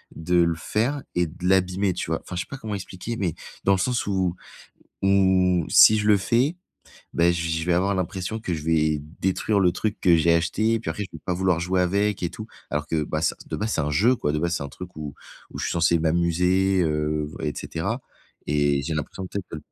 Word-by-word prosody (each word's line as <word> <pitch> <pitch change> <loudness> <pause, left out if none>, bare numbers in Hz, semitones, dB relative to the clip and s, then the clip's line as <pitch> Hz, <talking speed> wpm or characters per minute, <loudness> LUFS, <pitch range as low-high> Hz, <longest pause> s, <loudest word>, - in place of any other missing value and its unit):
de 90 +2 -1
le 85 -1 +1
faire 115 - -1
et 90 0 +2
de 90 +3 -5
l'abîmer, 95 +1 +2
tu 85 - -4
vois? 80 - 0
Enfin, 90 - -8
je 90 - -1
sais - - -8
pas 140 - -6
comment 110 -5 -5
expliquer, 95 +4 -6
mais 95 -7 -1 0.3
dans 100 - +3
le - - +2
sens 125 +5 0
où 95 -3 0 0.7
où 95 -3 +3
si 110 - +7
je 105 - -1
le 105 -1 +6
fais, 120 - +1 0.6
ben 85 +1 +3
j 85 -1 -2
je 80 0 -1
vais 90 - +2
avoir 95 +3 +1
l'impression 95 +4 -3
que 95 - -4
je 75 -2 -6
vais 80 -2 +2 0.2
détruire 100 +2 +1
le 90 -2 +4
truc 110 +3 -3
que 85 -2 +5
j'ai 85 +1 +3
acheté, 110 +7 +1
puis - - -4
après 105 - -3
je 95 - -12
vais 80 - -9
pas 90 - -1
vouloir 90 -2 +1
jouer 90 +1 0
avec 100 +3 +1
et 85 - -1
tout. - - -9 0.2
Alors 75 0 -2
que, 80 -1 0
bah 75 +2 -3
ça, 80 - +1
de - - -5
base, 110 +1 -2
c'est - - 0
un 75 0 -1
jeu 110 - +4
quoi, 75 - -1
de 75 - 0
base, 85 +1 0
c'est - - -4
un - - -5
truc 90 +5 -10
où 75 -2 -6 0.4
où - - -8
je - - -2
suis - - -2
censé 85 0 +3
m'amuser, 90 +4 +2
heu 75 -1 -1
et 75 - -1
cetera 100 +10 -3 0.5
et 70 -1 +2
j'ai 80 +3 -3
l'impression 85 +5 -4
peut-être 100 +1 -5
que 80 - -5
90 Hz, 235 wpm, -24 LUFS, 80-100 Hz, 0.7 s, si